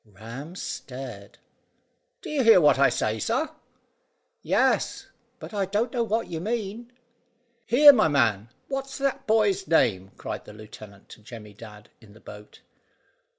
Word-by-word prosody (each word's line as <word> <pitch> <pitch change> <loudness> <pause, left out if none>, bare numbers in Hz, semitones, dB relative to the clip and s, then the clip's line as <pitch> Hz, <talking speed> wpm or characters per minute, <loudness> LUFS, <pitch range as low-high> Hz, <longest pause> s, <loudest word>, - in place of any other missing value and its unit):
Ram 115 - -10
stared. 125 - -8 0.9
"Do - - -7
you 285 -3 +1
hear 225 -5 +7
what 150 -4 +4
I 140 - +5
say, 110 0 -2
sir?" 255 - -1 0.9
"Yes, - - 0 0.3
but - - -11
I 200 -2 -1
dunno 230 +5 -1
what 225 0 -1
you 165 - -5
mean." 225 +3 -4 0.8
"Here, 290 +4 +8
my 215 -9 +3
man, 115 -7 +1 0.2
what's 270 0 -5
that 275 -1 -2
boy's 205 -3 +1
name?" 95 - +2
cried - - -7
the - - -12
lieutenant 105 -2 -13
to - - -14
Jemmy 105 -2 -12
Dadd 105 0 -13
in 105 -3 -17
the 110 - -17
boat. 105 0 -13
150 Hz, 145 wpm, -25 LUFS, -, 0.9 s, Here